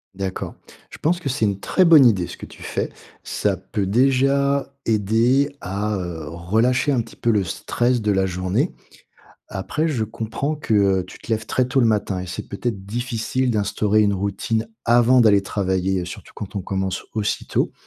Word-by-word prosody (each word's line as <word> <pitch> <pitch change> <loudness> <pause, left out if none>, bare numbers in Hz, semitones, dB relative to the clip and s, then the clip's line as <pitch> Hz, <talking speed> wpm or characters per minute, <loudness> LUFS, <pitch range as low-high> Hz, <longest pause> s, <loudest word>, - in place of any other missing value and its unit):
D'accord, 95 -1 -4 0.3
je - - -11
pense 175 +3 +1
que 155 -6 -3
c'est 125 -4 0
une 100 -1 -1
très 185 - +2
bonne 160 -5 +8
idée, 100 -7 +4
ce - - -8
que - - -10
tu - - -13
fais. - - -2 0.3
Ça 100 -2 0
peut 95 +2 -3
déjà 135 +5 +2
aider 115 +7 +2
à, 105 +3 -2
heu, 85 -4 -5
relâcher 110 - +1
un 130 -4 +2
petit - - -12
peu 120 - -1
le 105 -3 +3
stress 120 +6 0
de 105 -1 +1
la 95 -1 +2
journée. 90 0 -1 0.8
Après, 150 +12 -2
je 125 -8 0
comprends 115 +7 -3
que, 150 -7 -2 0.3
heu, - - -11
tu 90 - -13
te - - -12
lèves 110 0 -1
très 130 - +1
tôt 135 +1 +1
le 120 - +4
matin 105 -4 0
et 90 - -6
c'est 90 - -6
peut-être 100 -1 -4
difficile 120 +3 -1
d'instaurer 105 0 +2
une 100 -1 +2
routine 110 +4 -2 0.2
avant 120 +2 +5
d'aller 105 -4 +5
travailler, 95 -1 -1
surtout 85 - -9
quand 100 0 -8
on 100 - -2
commence 95 0 -2
aussi 105 -2 -1
tôt. - - 0
110 Hz, 190 wpm, -22 LUFS, 95-125 Hz, 0.8 s, bonne